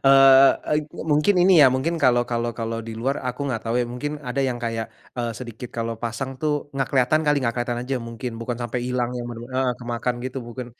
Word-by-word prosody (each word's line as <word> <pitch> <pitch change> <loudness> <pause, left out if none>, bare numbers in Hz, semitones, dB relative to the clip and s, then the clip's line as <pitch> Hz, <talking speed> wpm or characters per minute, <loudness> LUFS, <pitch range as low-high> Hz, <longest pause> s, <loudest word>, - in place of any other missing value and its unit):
Eee 135 0 +8 0.2
eee, 150 - +2 0.3
mungkin 150 +7 +3
ini 180 -3 +7
ya, 130 - +7
mungkin 130 +6 0
kalau 120 -2 +4
kalau 120 0 -1
kalau 115 0 -2
di 115 0 -7
luar 135 +4 0
aku 125 +2 -4
gak 125 -5 -2
tahu 115 0 -2
ya, 120 - +1
mungkin 145 +5 -4
ada 135 -1 -2
yang 125 -2 -1
kayak, 115 -1 -3 0.2
eee, 120 -1 -2
sedikit 120 -1 -8
kalau 115 0 -3
pasang 130 +3 -3
tuh 150 +1 -1
gak 135 -1 -1
kelihatan 135 +4 +3
kali, 150 -1 +3
gak 115 -4 -1
kelihatan 120 -1 -2
aja 135 - -1
mungkin, 115 +1 -6
bukan 120 0 -3
sampai 120 0 -3
hilang 125 0 -1
yang 120 -1 -4
bener-bener 120 +2 -8
heeh, 130 -1 +2
kemakan 120 0 -2
gitu 130 +1 -5
bukan 120 +1 -7
125 Hz, 220 wpm, -23 LUFS, 120-135 Hz, 0.3 s, Eee